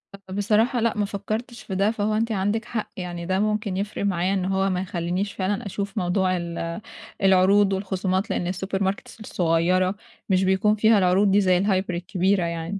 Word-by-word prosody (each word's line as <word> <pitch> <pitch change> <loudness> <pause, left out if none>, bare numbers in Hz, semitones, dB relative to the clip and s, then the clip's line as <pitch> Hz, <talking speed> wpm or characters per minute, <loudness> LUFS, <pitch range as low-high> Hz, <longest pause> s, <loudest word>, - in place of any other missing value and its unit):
أ 195 -1 -15
بصراحة 215 +5 +2
لأ، 230 -1 0
ما 205 - +1
فكّرتش 215 +4 -5
في 190 - -5
ده، 200 +3 +2
فهو 215 -1 -1
أنتِ 225 +2 0
عندِك 210 +2 -1
حق، 230 -2 -4
يعني 175 -2 -5
ده 185 +2 0
ممكن 210 -2 -1
يفرق 200 0 -3
معايا 185 -1 0
إن 190 -2 -1
هو 195 +1 +1
ما 180 -1 -1
يخلّينيش 180 +2 -2
فعلًا 200 +4 -2
أشوف 200 +1 -5
موضوع 185 0 +1
ال 170 +1 -4 0.4
العروض 195 +1 +5
والخصومات 190 0 -1
لإن 175 0 -1
الsuper 190 +1 -3
markets 195 +3 -3
الصغيّرة، 185 -1 +1 0.3
مش 190 -1 +3
بيكون 190 +3 +3
فيها 220 +1 +4
العروض 190 +1 +3
دي 205 +1 +4
زي 185 -2 +3
الهايبر 190 -1 0
الكبيرة 185 +1 0
يعني. 170 +3 -3
195 Hz, 185 wpm, -24 LUFS, 185-205 Hz, 0.4 s, العروض